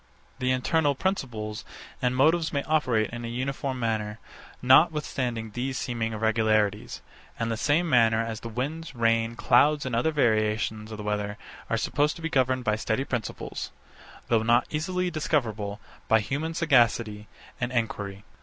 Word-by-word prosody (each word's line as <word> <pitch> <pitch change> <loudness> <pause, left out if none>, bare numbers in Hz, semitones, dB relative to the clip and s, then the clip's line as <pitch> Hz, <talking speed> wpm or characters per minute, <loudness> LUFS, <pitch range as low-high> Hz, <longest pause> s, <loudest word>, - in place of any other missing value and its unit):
The 130 0 0
internal 140 +3 +2
principles 120 - -3 0.4
and 125 0 +1
motives 160 +5 +3
may 140 -1 -1
operate 130 -9 +1
in 120 0 -6
a - - -4
uniform 130 +2 -3
manner, 110 -2 -2 0.4
notwithstanding 130 -5 +2
these 130 +4 -3
seeming 115 -2 -2
irregularities; 110 -1 0 0.4
in 115 0 -1
the 115 - 0
same 145 +9 +1
manner 115 -6 +4
as 115 -1 -3
the 115 - -7
winds, 140 +6 -4
rain, 115 0 +1
clouds, 145 +5 +3
and 130 -2 -2
other 120 +7 +2
variations 110 -5 0
of 110 - -6
the 105 - -6
weather 105 0 -2 0.3
are - - +1
supposed 145 +2 +1
to 170 - -11
be 165 - -1
governed 130 -3 +1
by 110 -2 +1
steady 110 +3 -1
principles; 120 -5 -4 0.6
though 115 -2 +3
not 120 +2 +3
easily 180 +4 -1
discoverable 110 -10 -1 0.3
by 110 - +5
human 150 +9 -3
sagacity 115 -9 +2 0.3
and 125 0 -1
enquiry. 105 -4 -3
120 Hz, 155 wpm, -27 LUFS, 110-140 Hz, 0.6 s, by